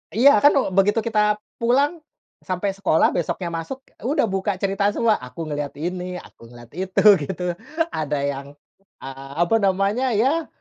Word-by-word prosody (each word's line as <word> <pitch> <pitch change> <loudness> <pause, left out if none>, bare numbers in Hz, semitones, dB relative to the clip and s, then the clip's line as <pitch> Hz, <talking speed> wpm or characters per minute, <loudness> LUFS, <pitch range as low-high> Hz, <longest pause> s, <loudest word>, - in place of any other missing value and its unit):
Iya 275 +6 +6
kan, 290 - +7
eee, 270 - +1
begitu 205 +3 +4
kita 210 -2 +2 0.2
pulang, 280 +8 +2 0.4
sampai 185 +2 -2
sekolah 190 -5 +2
besoknya 175 +1 -2
masuk, 165 +11 -4 0.2
udah 275 +6 +1
buka 195 0 -1
cerita 195 +1 0
semua, 230 -2 +3
aku 125 +7 -7
ngelihat 145 -2 -4
ini, 180 +3 -4
aku 115 - -14
ngelihat 120 -1 -14
itu, 185 +3 -1 0.3
gitu. 180 -1 -4 0.5
Ada 150 -1 -2
yang, 140 -1 -4 0.6
eee, 135 0 -9
apa 175 +6 +1
namanya 200 +5 +1
ya, 290 +9 +1
190 Hz, 155 wpm, -22 LUFS, 160-225 Hz, 0.6 s, kan